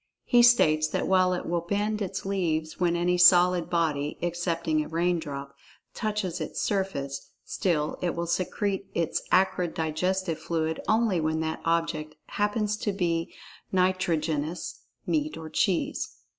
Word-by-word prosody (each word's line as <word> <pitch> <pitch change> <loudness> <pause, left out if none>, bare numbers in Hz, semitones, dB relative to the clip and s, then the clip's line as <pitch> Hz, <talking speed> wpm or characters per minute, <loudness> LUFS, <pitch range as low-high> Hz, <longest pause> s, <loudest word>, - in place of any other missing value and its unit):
He 245 - +4
states 155 -11 +5
that - - -2
while 185 -1 +4
it 180 - -3
will 170 0 -1
bend 205 +4 -1
its 195 -1 -4
leaves 160 -5 -1
when 175 -1 +2
any 175 +1 +1
solid 180 -1 +6
body 150 -4 0
(excepting 170 -2 -1
a - - -8
raindrop) 160 -5 -2 0.4
touches 210 -5 -2
its - - -4
surface, 140 -9 -2 0.2
still 155 -5 -1
it 175 - -1
will 170 0 -2
secrete 190 +3 -1
its 165 -2 0
acrid 185 -2 +2
digestive 165 +2 -1
fluid 160 -1 -2
only 215 -6 +2
when 160 0 0
that 160 0 -3
object 165 -2 -1
happens 210 0 0
to 210 - -1
be 170 -4 -1 0.4
nitrogenous 170 -4 0 0.3
(meat 155 -2 -1
or 160 -1 -8
cheese). 175 +2 0
175 Hz, 140 wpm, -27 LUFS, 160-190 Hz, 0.4 s, solid